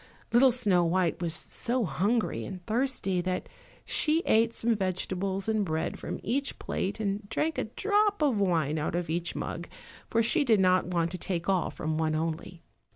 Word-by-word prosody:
Little 255 +2 +7
Snow 205 -8 +2
white 170 0 +1
was 165 -1 -2
so 240 -1 0
hungry 200 - 0
and 185 -2 -8
thirsty 220 -6 0
that 185 0 -2 0.4
she 320 +2 +2
ate 225 +1 +4
some 230 0 +1
vegetables 190 0 -2
and 220 -1 +1
bread 160 -3 -2
from - - -5
each 275 +6 -1
plate 200 +2 -3
and 200 -1 -2
drank 315 +7 -1
a - - -1
drop 410 - +1
of 260 -8 +2
wine 160 -6 +1
out 155 +2 -2
of 175 -2 -2
each 170 +1 -2
mug, 170 +1 -4 0.4
for 230 0 +2
she 295 +7 +3
did 225 -6 +4
not 185 -1 +3
wish 170 -2 0
to 180 - -5
take 170 -1 -2
all 190 -3 +2
from 155 0 -3
one 155 -1 +1
only. 165 +1 -4
190 Hz, 180 wpm, -29 LUFS, 170-230 Hz, 0.4 s, Little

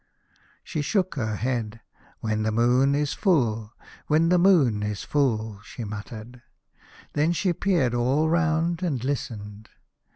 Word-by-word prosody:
She 155 - -3
shook 185 +4 0
her 110 -5 -2
head. 115 -2 -2 0.2
" - - -30
When 110 -1 -1
the 110 0 0
moon 125 +5 +3
is 145 0 0
full, 115 - +1 0.3
when 160 +2 +3
the 180 0 +4
moon 155 - +4
is 105 -1 -3
full," 110 -7 0
she 115 +2 -8
muttered. 110 +3 -8 0.7
Then 155 +4 +2
she 180 +1 0
peered 165 -10 +1
all 130 +6 +2
round, 165 +1 +1
and 145 -10 -1
listened. 110 -6 -5
125 Hz, 140 wpm, -25 LUFS, 110-160 Hz, 0.7 s, the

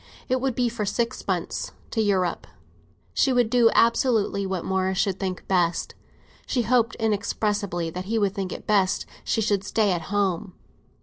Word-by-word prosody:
It 255 0 0
would 265 -3 0
be 245 -1 +2
for 230 -2 -3
six 230 +3 -2
months, - - -2 0.2
to 225 - +1
Europe; 190 -4 0 0.7
she 270 - +3
would 245 -3 +2
do 240 -2 +5
absolutely 230 -4 +2
what 190 -3 -3
Morris 190 0 0
should 195 -1 0
think 185 -2 -4
best. 175 -3 +1 0.5
She 245 - +1
hoped 235 +1 +2
inexpressibly 205 -5 -1
that 180 +2 -5
he 225 +3 -1
would 200 -3 +1
think 195 -3 -3
it - - -7
best 195 -3 +2 0.2
she 225 - 0
should 205 -3 +1
stay 210 -2 +1
at 175 -2 0
home. 195 -3 0
205 Hz, 170 wpm, -25 LUFS, 190-230 Hz, 0.7 s, do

